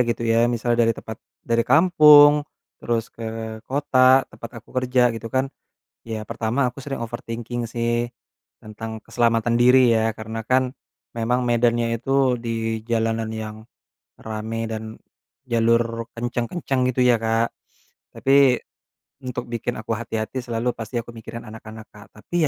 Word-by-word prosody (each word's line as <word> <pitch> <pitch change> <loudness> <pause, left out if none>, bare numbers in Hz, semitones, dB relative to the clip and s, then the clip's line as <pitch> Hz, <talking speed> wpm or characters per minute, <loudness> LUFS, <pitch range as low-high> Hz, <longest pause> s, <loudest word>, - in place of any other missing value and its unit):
gitu 120 0 -1
ya, 115 0 +3
misalnya 120 0 +1
dari 115 - +3
tempat, 110 - -8 0.3
dari 115 0 +1
kampung, 150 -1 +7 0.4
terus 115 -1 -1
ke 110 -1 -6
kota 130 -1 +4
tempat 115 - -9
aku 110 - -24
kerja 125 -1 +2
gitu 115 0 -6
kan. 130 +2 0 0.6
Ya 110 -1 -4
pertama, 120 +4 0
aku 130 - -12
sering 135 -2 -5
overthinking 120 0 -5
sih 120 +1 -1 0.5
tentang 110 +1 -7
keselamatan 115 -1 +1
diri 125 0 +6
ya, 110 0 +2
karena 110 +1 -6
kan 130 0 +2 0.4
memang 120 +2 0
medannya 120 -1 +2
itu 135 0 +1
di 115 -1 -2
jalanan 115 -1 0
yang 110 -1 -5 0.6
rame 110 +1 -4
dan 110 0 -4 0.6
jalur 115 0 +1
kenceng-kenceng 125 +3 -1
gitu 125 +1 -1
ya 125 -1 +5
Kak. 115 +1 +1 0.7
Tapi 135 -2 +4 0.7
untuk 125 -1 -4
bikin 120 +1 -3
aku 110 +1 -3
hati-hati 115 +2 -4
selalu, 120 0 -2
pasti 115 +1 -5
aku 120 0 -8
mikirin 115 +1 -9
anak-anak 110 0 -10
Kak. 105 -1 -14
Tapi 175 +9 -1
115 Hz, 140 wpm, -22 LUFS, 115-125 Hz, 0.7 s, kampung